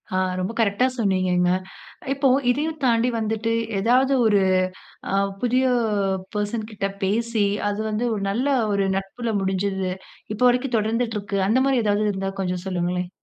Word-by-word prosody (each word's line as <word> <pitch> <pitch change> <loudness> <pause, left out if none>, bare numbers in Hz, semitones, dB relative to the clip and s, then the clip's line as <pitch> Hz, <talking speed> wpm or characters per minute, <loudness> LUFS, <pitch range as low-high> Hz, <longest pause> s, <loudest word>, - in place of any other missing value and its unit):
ஆ, - - +2 0.2
ரொம்ப 185 +3 -2
கரெக்ட்டா 215 +3 +2
சொன்னீங்கங்க. 185 -3 +2 0.6
இப்போ 275 0 +1 0.2
இதையும் 310 +4 -2
தாண்டி 235 +1 +3
வந்துட்டு 220 +1 -1 0.3
ஏதாவது 255 +6 +3
ஒரு 205 -2 +4 0.7
அ - - +1 0.3
புதிய 250 +2 +2 0.7
பெர்சன் 210 +1 -2
கிட்ட 200 -1 -3 0.2
பேசி, 220 +2 0 0.2
அது 205 0 -2
வந்து 215 +3 -1
ஒரு 205 - -3
நல்ல 240 +8 0 0.2
ஒரு 200 -1 +1
நட்பில 210 +5 -3
முடிஞ்சது. 190 0 -1 0.4
இப்போ 215 - -2
வரைக்கும் 250 0 0
தொடர்ந்துட்டு 225 +1 -1
இருக்கு. 200 0 -4
அந்த 240 +5 +3
மாரி 270 -3 +2
ஏதாவது 210 0 +1
இருந்தா 195 0 -3
கொஞ்சம் 180 -1 -2
சொல்லுங்களேன். 180 -1 -2
210 Hz, 145 wpm, -23 LUFS, 195-240 Hz, 0.7 s, ஒரு